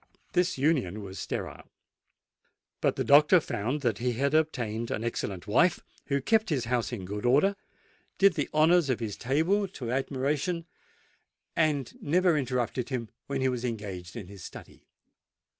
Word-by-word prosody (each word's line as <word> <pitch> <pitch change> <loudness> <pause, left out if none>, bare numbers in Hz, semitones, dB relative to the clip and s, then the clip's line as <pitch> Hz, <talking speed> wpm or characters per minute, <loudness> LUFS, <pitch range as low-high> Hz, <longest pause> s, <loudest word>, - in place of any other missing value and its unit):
This 180 -3 +1
union 130 - +1
was 95 -1 -8
sterile; - - -5 1.1
but - - +2
the - - -1
doctor 150 +5 +6
found 130 0 -3
that 115 -6 0
he 125 0 0
had 140 +5 0
obtained 120 -8 0
an 110 - -2
excellent 100 -6 -3
wife, 165 - +3 0.3
who 140 -1 +1
kept 220 +3 +2
his 135 -7 0
house 120 0 -1
in 105 -7 -5
good 105 +2 -5
order—did 195 +6 +1
the 150 -4 -2
honours 160 0 +4
of 130 - +1
his 110 -4 -4
table 165 +11 +1
to 125 -10 -6
admiration—and 140 +6 -1 1.4
never 175 +2 +3
interrupted 125 -3 -1
him 120 -4 -3 0.2
when 140 -1 -2
he 130 - +2
was 125 -2 -2
engaged 100 -6 -5
in 115 -5 -6
his 95 0 -11
study. - - -12
130 Hz, 150 wpm, -28 LUFS, 115-155 Hz, 1.4 s, doctor